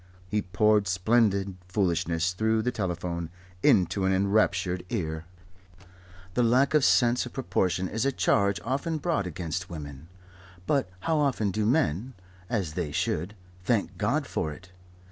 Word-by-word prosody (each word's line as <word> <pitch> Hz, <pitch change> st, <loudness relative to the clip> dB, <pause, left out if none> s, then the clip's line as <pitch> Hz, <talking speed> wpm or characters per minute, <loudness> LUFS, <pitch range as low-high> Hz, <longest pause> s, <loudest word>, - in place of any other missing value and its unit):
He 105 Hz, +3 st, 0 dB
poured 105 Hz, +3 st, +2 dB
splendid 100 Hz, 0 st, +2 dB
foolishness 90 Hz, -2 st, 0 dB
through 110 Hz, +3 st, +1 dB
the 125 Hz, -, 0 dB
telephone 85 Hz, -5 st, -3 dB, 0.3 s
into 95 Hz, +1 st, +3 dB
an 95 Hz, -, +2 dB
enraptured 95 Hz, -2 st, +1 dB
ear. 80 Hz, -8 st, -3 dB, 1.1 s
The 125 Hz, -, +1 dB
lack 125 Hz, +5 st, +3 dB
of 155 Hz, -, +6 dB
a -, -, -5 dB
sense 125 Hz, -1 st, +3 dB
of -, -, -12 dB
proportion 95 Hz, -6 st, 0 dB
is 110 Hz, +5 st, -2 dB
a 140 Hz, -, +2 dB
charge 100 Hz, -5 st, +2 dB
often 140 Hz, +6 st, -1 dB
brought 155 Hz, -, -1 dB
against 90 Hz, +2 st, -4 dB
women; 75 Hz, -2 st, -8 dB, 0.6 s
but 135 Hz, -7 st, +1 dB
how 160 Hz, +8 st, +1 dB
often 125 Hz, -8 st, +1 dB
do 105 Hz, +2 st, 0 dB
men 125 Hz, -, +1 dB, 0.3 s
(as 95 Hz, -9 st, -1 dB
they 80 Hz, -3 st, -3 dB
should) 90 Hz, +8 st, -2 dB, 0.3 s
thank 100 Hz, -3 st, 0 dB
God 140 Hz, +8 st, +1 dB
for 80 Hz, -10 st, -2 dB
it? 90 Hz, +5 st, -12 dB
100 Hz, 145 wpm, -27 LUFS, 90-115 Hz, 1.1 s, of